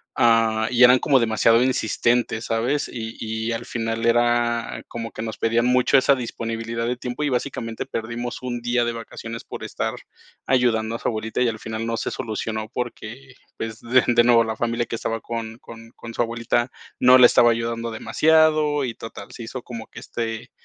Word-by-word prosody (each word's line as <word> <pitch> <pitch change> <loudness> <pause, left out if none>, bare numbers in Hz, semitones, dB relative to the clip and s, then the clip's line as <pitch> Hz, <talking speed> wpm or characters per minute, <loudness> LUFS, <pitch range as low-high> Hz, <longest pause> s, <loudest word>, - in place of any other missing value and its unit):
Ah, 115 -1 +3
y 125 +1 +4
eran 125 +1 +8
como 135 -3 +3
demasiado 115 +1 +3
insistentes, 120 -2 0
¿sabes? 120 +6 0
Y 115 -2 -6
y 110 +1 -3
al 115 +1 -4
final 115 0 -3
era 120 0 +1
como 115 -1 -6
que - - -7
nos 110 -1 -5
pedían 115 +2 +1
mucho 125 +2 +4
esa 140 +1 +4
disponibilidad 115 -1 -4
de 125 0 -1
tiempo. 125 +4 -4
Y 145 - +1
básicamente 115 -2 -3
perdimos 120 +2 -5
un 120 -2 -4
día 120 0 +1
de 120 - -1
vacaciones 115 0 -7
por - - -8
estar - - -3 0.5
ayudando 115 -3 +2
a - - -5
su - - -3
abuelita, 110 +2 -3
y 125 - +3
al 110 -1 -5
final 110 +1 -5
no 115 0 -1
se - - -2
solucionó 110 -2 -4
porque, 125 +2 -6 0.2
pues, 115 -1 -6
de 125 +2 +3
de 120 -1 +5
nuevo, 120 -1 +5
la 110 -1 -3
familia 115 0 -1
que - - -3
estaba 115 0 -3
con 115 0 -6
con 115 0 -13
con 115 0 -9
su 120 - +2
abuelita 115 +1 -1 0.3
no 125 +1 +7
le 125 - +10
estaba 120 0 +5
ayudando 115 0 -2
demasiado 155 +3 +3
y 115 - -4
total, 115 - -9
se 120 - -9
hizo 125 +2 -6
como 115 -3 -8
que - - -18
este 115 -1 -4
115 Hz, 190 wpm, -23 LUFS, 115-125 Hz, 0.5 s, le